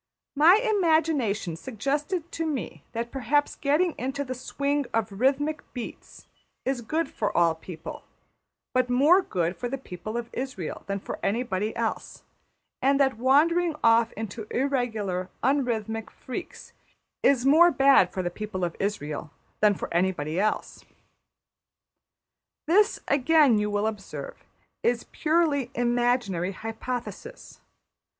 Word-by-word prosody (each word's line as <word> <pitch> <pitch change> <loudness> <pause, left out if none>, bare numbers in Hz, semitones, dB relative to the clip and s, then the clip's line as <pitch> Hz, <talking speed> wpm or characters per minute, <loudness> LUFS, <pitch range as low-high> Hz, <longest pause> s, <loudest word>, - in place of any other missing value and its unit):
My 320 +6 +7
imagination 320 - +1
suggested 290 - -3
to 330 - -3
me 200 - -4
that 235 +1 -3
perhaps 290 +2 +1
getting 305 +5 +1
into 270 +2 -2
the 255 -2 -4
swing 280 +2 -2
of 225 -2 0
rhythmic 275 +8 +1
beats 245 - -8 0.4
is 260 -1 -1
good 315 +7 -1
for 210 -6 -2
all 170 -1 +4
people, 160 0 -9 0.7
but 255 -1 +2
more 290 +10 +5
good 175 - -1
for 245 - -4
the 270 - -3
people 215 -2 -7
of 235 0 -5
Israël 255 -11 -5
than 200 0 -2
for - - -6
anybody 215 -1 -1
else; 230 -1 -3 0.6
and 275 +1 +3
that 265 -4 +2
wandering 320 +6 +3
off 230 0 +5
into 220 0 -6
irregular 220 -9 -1
un 275 +3 +3
rhythmic 225 -2 -3
freaks 260 +7 -8 0.5
is 265 -2 +3
more 320 +5 +7
bad 270 - +5
for 185 - -3
the 175 - -2
people 200 -1 -5
of 170 -1 -2
Israël 155 -8 -3 0.3
than 210 -1 +4
for - - -5
anybody 170 -2 0
else. 215 +2 -1 1.8
This, 405 +8 +3
again, 280 -4 +4
you 210 0 0
will 205 0 0
observe, 220 - -6 0.4
is 240 0 +1
purely 305 -5 +1
imaginary 240 -6 +1
hypothesis. 240 - -6
245 Hz, 130 wpm, -26 LUFS, 210-285 Hz, 1.8 s, My